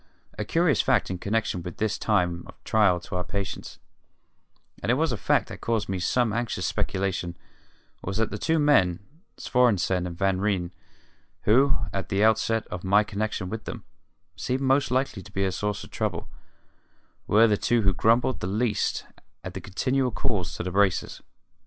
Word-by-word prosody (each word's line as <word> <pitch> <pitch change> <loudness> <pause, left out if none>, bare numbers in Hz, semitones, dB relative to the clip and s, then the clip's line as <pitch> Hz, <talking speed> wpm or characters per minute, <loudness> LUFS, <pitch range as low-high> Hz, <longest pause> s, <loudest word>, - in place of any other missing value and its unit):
A - - -3
curious 165 -3 +3
fact 125 -8 +2
in 90 - -4
connection 105 -2 -1
with 85 0 -7
this 110 -1 -1
time 90 -5 +1
of - - -12
trial 100 -5 +3
to 90 - -7
our 90 - -1
patience 100 +2 -5 1.0
and 95 - -3
it - - +4
was 160 +1 +1
a - - 0
fact 95 - +1
that - - -9
caused 115 -3 0
me 95 -1 -2
some 115 +5 +1
anxious 120 0 -2
speculation 95 -2 -2 0.7
was 100 +2 -3
that 110 0 0
the 105 - -4
two 160 0 +1
men, 100 - +3 0.3
Svorenssen 95 -7 +2
and 85 -1 -7
Van 95 0 +1
Ryn, 95 -4 0 0.7
who, 130 +6 +4 0.2
at 95 -2 -3
the 100 +1 +2
outset 110 0 +2
of 90 - -6
my 100 +3 +4
connection 105 -2 -3
with 110 +3 -6
them, - - -6 0.5
seemed 125 +9 -2
most 135 +1 +2
likely 130 -5 0
to 105 - -14
be 95 0 0
a 95 - 0
source 105 +2 -2
of - - -13
trouble, - - -2 1.0
were 110 +2 +6
the 105 -2 +3
two 115 +2 +1
who 100 -1 +3
grumbled 115 +5 +2
least 105 +3 0 0.4
at - - -6
the - - -6
continual 130 +7 0
calls 105 -6 -2
to - - -4
the 90 - -3
braces. 95 -1 +1
105 Hz, 175 wpm, -26 LUFS, 95-120 Hz, 1.0 s, were